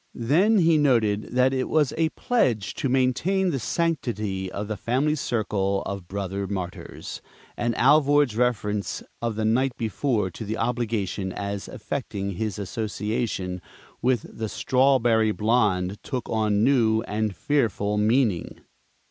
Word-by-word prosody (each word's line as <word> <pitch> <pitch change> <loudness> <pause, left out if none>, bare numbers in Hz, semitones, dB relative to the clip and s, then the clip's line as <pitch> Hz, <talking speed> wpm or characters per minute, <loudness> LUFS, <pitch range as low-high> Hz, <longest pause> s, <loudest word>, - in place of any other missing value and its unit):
Then 170 - +3
he 165 -4 +4
noted 115 -7 +2
that 130 +1 +4
it 130 -1 -1
was 150 -4 +2
a 160 0 +2
pledge 125 - 0
to 135 - -2
maintain 135 +9 +2
the 135 - -1
sanctity 110 - -2
of 100 +1 -4
the 110 - -3
family 130 +9 0
circle 105 -8 -1
of 100 -3 -5
brother 100 0 -3
Martyrs, 95 -3 -6 0.3
and 120 -1 -1
Alvord's 145 -2 +4
reference 105 -4 -1 0.2
of 115 -2 -1
the 110 0 -1
night 125 +3 +1
before 110 -3 -1
to 100 - -7
the 110 +1 -3
obligation 110 -5 -1
as 100 +1 -4
affecting 105 -5 -4
his 105 +1 -3
association 105 -2 -3 0.4
with 125 -3 +1
the 110 -1 -5
"strawberry 120 -5 +3
blonde" 105 -4 +1
took 130 -3 -4
on 105 -2 +1
new 115 -4 +3
and 105 -2 -2
fearful 110 -7 0
meaning. 110 -4 +1
110 Hz, 135 wpm, -25 LUFS, 105-130 Hz, 0.4 s, he